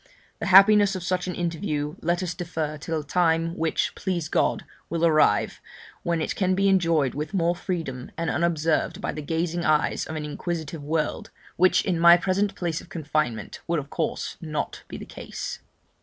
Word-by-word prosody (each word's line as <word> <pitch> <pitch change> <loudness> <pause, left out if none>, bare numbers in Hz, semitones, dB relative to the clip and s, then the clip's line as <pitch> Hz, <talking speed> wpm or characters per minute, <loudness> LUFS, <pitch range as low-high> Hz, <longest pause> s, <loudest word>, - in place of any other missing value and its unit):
The - - -3
happiness 200 +1 +7
of 185 - -4
such 185 +1 -1
an 180 - -3
interview 160 -3 -2
let 175 +2 0
us 180 -1 -2
defer 165 -3 -3
till 160 +1 -2
a - - -12
time 165 +1 +1
(which, 165 -2 0
please 175 -6 -3
God, - - +1 0.2
will 170 +1 +1
arrive) 155 -10 +3 0.4
when 170 -2 0
it - - -3
can 185 -1 +1
be 195 +1 +2
enjoyed 165 -8 +3
with 150 +7 -4
more 175 -1 +2
freedom, 165 -9 -4
and 165 - -2
unobserved 165 -1 0
by - - -2
the 155 - -6
gazing 165 +3 -1
eyes 155 -1 +1
of 160 - -5
an 155 -1 -3
inquisitive 160 0 -4
world, 155 +1 -2 0.3
which 185 +1 +4
in 180 -4 0
my 170 +1 +8
present 195 +3 0
place 170 -2 -2
of - - -16
confinement 155 -7 -2
would 170 0 +1
of 145 -1 -5
course 165 - -3
not 155 -2 -4
be - - -7
the - - -8
case. - - -7
165 Hz, 185 wpm, -25 LUFS, 155-180 Hz, 0.4 s, my